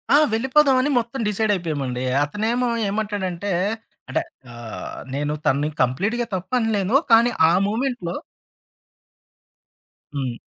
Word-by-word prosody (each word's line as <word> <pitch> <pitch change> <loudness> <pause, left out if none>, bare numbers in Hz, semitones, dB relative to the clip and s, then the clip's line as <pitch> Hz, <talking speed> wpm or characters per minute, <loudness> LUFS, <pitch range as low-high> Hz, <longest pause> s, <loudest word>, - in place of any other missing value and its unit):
ఆ! - - +8 0.2
వెళ్ళిపోదామని 265 +3 +3
మొత్తం 235 +3 -5
డిసైడయిపోయామండి. 165 - -1 0.2
అతనేమో 225 +10 -1 0.2
ఏమంటాడంటే, 200 -2 -2 0.6
అంటే 135 - 0 0.3
ఆహ్, 120 -2 -7 0.2
నేను 145 +2 -1
తనని 145 +3 +2
కంప్లీట్‌గా 200 - 0
తప్పనలేను. 220 +1 0 0.2
కానీ 235 +2 +6 0.2
ఆ - - +4 0.2
మూమెంట్‌లో 230 -5 -2 2.0
హ్మ్. 130 -4 -2
205 Hz, 90 wpm, -22 LUFS, 150-240 Hz, 2.0 s, ఆ